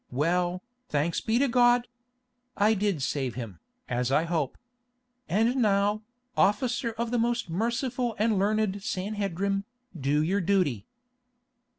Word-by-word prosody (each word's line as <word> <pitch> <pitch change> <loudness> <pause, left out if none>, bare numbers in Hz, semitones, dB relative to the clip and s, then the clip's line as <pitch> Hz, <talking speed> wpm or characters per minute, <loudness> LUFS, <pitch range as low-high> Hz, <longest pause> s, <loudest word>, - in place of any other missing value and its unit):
Well, 175 +6 0 0.3
thanks 150 +3 0
be 225 +1 +1
to 280 +2 +3
God! 240 0 +4 0.7
I 210 +2 +4
did 200 -8 0
save 130 -2 -1
him, 110 -9 -7 0.3
as 125 +1 -1
I 150 +3 +3
hope. 165 -5 -1 0.7
And 225 +6 +2
now, 205 -2 +2 0.3
officer 230 +3 +1
of 230 +1 -3
the 245 - +1
most 235 -5 0
merciful 235 +4 -1
and 215 -1 +2
learned 205 0 +1
Sanhedrim, 195 0 -2 0.3
do 145 0 +1
your 195 +5 +1
duty." 165 - +1
200 Hz, 125 wpm, -28 LUFS, 165-225 Hz, 0.7 s, God